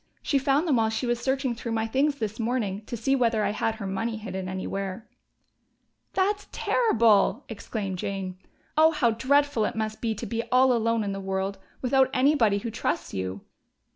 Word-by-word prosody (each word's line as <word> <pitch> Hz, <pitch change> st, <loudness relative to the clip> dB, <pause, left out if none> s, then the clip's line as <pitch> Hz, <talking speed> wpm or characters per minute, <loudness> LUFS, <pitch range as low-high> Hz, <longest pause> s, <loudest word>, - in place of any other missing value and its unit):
She 280 Hz, -, +2 dB
found 275 Hz, +5 st, +2 dB
them 280 Hz, -6 st, +3 dB
while 220 Hz, -1 st, +2 dB
she 220 Hz, +3 st, -2 dB
was 240 Hz, -1 st, 0 dB
searching 265 Hz, 0 st, 0 dB
through 230 Hz, 0 st, -5 dB
my 225 Hz, 0 st, 0 dB
things 275 Hz, +6 st, +1 dB
this 220 Hz, -4 st, -4 dB
morning, 220 Hz, -4 st, -1 dB
to 240 Hz, -, -4 dB
see 270 Hz, +5 st, +1 dB
whether 230 Hz, -4 st, +2 dB
I 200 Hz, -, +1 dB
had 220 Hz, +1 st, -1 dB
her 220 Hz, -3 st, -6 dB
money 220 Hz, +4 st, -2 dB
hidden 190 Hz, -4 st, -5 dB
anywhere." 195 Hz, +2 st, -4 dB, 1.1 s
"That's 405 Hz, +2 st, 0 dB
terrible!" 230 Hz, -, +3 dB
exclaimed 205 Hz, -3 st, -5 dB
Jane. 190 Hz, -2 st, -4 dB, 0.4 s
"Oh, 315 Hz, +1 st, +6 dB
how 240 Hz, -6 st, +2 dB
dreadful 280 Hz, +1 st, +2 dB
it -, -, -3 dB
must 220 Hz, 0 st, -3 dB
be 225 Hz, -2 st, -1 dB
to 215 Hz, -, -6 dB
be 230 Hz, -1 st, -2 dB
all 255 Hz, 0 st, +5 dB
alone 230 Hz, -1 st, +1 dB
in 200 Hz, -, -2 dB
the 195 Hz, -, -4 dB
world, 190 Hz, 0 st, -2 dB, 0.2 s
without 260 Hz, +1 st, +4 dB
anybody 255 Hz, -6 st, +4 dB
who 225 Hz, +3 st, -4 dB
trusts 175 Hz, -5 st, -2 dB
you!" 95 Hz, +1 st, -4 dB
225 Hz, 185 wpm, -26 LUFS, 200-260 Hz, 1.1 s, Oh